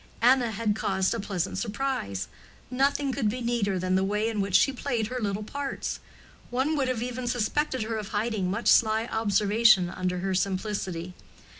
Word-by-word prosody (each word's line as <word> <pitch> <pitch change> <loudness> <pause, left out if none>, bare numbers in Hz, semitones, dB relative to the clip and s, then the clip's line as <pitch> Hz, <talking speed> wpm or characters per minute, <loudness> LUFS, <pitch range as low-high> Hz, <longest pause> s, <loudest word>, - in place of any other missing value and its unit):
Anna 250 -1 +5
had 215 -1 -1
caused 190 -3 0
a 230 - -3
pleasant 195 -4 -2
surprise; 215 - -2 0.4
nothing 275 +2 +1
could 245 -5 0
be 245 +4 -3
neater 235 -5 0
than 185 +1 -1
the 190 0 +3
way 210 +3 0
in 215 -3 -1
which 195 -1 -1
she 275 - +5
played 240 -5 -2
her 255 0 -3
little 205 -2 -2
parts; 280 +5 -4 0.5
one 265 +6 0
would 270 -3 0
even 250 +1 -3
have - - -1
suspected 255 +2 0
her 220 0 -3
of 210 -2 -5
hiding 210 -3 -1
much 205 +5 -2
sly 220 0 +4
observation 210 -3 +3
under 180 -1 -2
her 190 0 -1
simplicity. 185 -2 -2
220 Hz, 175 wpm, -27 LUFS, 195-245 Hz, 0.5 s, Anna